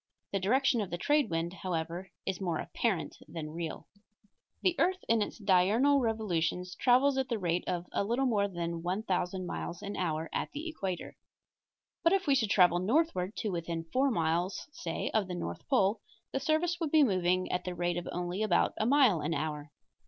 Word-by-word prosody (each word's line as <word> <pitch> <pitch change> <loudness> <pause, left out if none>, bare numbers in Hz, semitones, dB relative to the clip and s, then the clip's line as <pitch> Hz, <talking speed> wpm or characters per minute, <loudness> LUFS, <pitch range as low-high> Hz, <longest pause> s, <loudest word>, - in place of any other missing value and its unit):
The 195 - 0
direction 245 +4 +2
of 200 - -3
the 175 - -3
trade 290 +9 +2
wind, 165 +1 -1
however, 175 0 -4 0.2
is 190 0 -3
more 175 -4 0
apparent 195 -3 -2
than 155 -1 -6
real. 165 0 -5 0.8
The 365 -2 +3
earth 370 +3 +2
in 225 -1 +3
its - - -3
diurnal 210 +8 +4
revolutions 180 -6 -1
travels 265 +5 +3
at 265 - -1
the 235 - 0
rate 175 -3 0
of 175 -1 -2
a - - 0
little 240 +6 0
more 210 -5 +2
than 170 -3 -4
1000 185 0 -1
miles 175 0 -5
an 200 0 -4
hour 160 -3 -1
at - - -2
the 300 +3 -5
equator. 195 - -4 0.9
But 335 +2 +5
if 390 -1 +2
we 280 - +4
should 230 -6 +2
travel 175 -3 +5
northward 215 - +1
to 215 - -1
within 170 -1 -3
four 270 +2 +3
miles, 170 -2 0
say, 165 - -4
of 215 -4 +2
the 180 - -4
north 85 - -5
pole, 200 +2 +3 0.3
the 270 - -1
surface 320 +4 +1
point 330 - -1
would - - -8
be 310 -2 +7
moving 185 -5 +1
at 180 - -1
the 180 -1 -4
rate 175 0 -1
of 175 - -4
only 180 +3 -3
about 210 -5 +2
a 220 - +1
mile 255 - +5
an 160 +3 -1
hour. 150 0 -3
190 Hz, 195 wpm, -31 LUFS, 175-245 Hz, 0.9 s, be